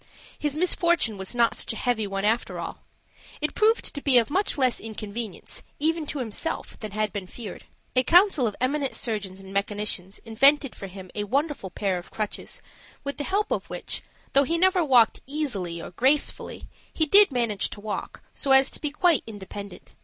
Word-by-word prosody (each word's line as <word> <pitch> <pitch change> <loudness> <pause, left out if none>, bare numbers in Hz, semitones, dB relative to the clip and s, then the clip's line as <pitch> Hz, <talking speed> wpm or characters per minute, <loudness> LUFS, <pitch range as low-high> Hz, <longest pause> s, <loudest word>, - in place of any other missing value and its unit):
His 295 -1 -1
misfortune 345 - +3
was 190 +5 -4
not 235 -1 +3
such - - -3
a - - -7
heavy 220 -2 0
one, 195 0 -2
after 225 +3 0
all. - - -6 0.6
It 300 - -1
proved 445 +2 +2
to 285 - -5
be 275 -3 +4
of 235 +3 +3
much 385 +1 +1
less 255 -3 +2
inconvenience, 220 -1 -5 0.2
even 320 +1 0
to 290 - -4
himself, 250 +6 -3
than 215 - -5
had 215 0 -2
been 195 -3 -5
feared. 210 -1 -9 0.3
A 255 - +6
council 345 - +5
of 210 - -4
eminent 275 +1 0
surgeons 205 -5 -2
and 190 0 -11
mechanicians 200 -1 -1
invented 275 +4 +4
for 195 - -8
him 185 -1 -11
a 205 - -2
wonderful 280 -2 -1
pair 190 0 -1
of 175 - -12
crutches, 215 -2 -5 0.4
with 280 0 -4
the 290 - -3
help 410 +2 0
of - - -2
which, - - -3 0.3
though 275 - +6
he 330 +5 0
never 370 0 +4
walked 250 -6 +4
easily 215 - -2
or 165 - -8
gracefully, 265 +10 +1 0.3
he 315 - +1
did 400 +3 +7
manage 230 -6 0
to - - -9
walk 210 0 -5
so 275 - +2
as 265 0 +6
to - - -5
be 300 - -1
quite 320 0 +3
independent. 200 -2 -9
240 Hz, 190 wpm, -25 LUFS, 205-295 Hz, 0.6 s, did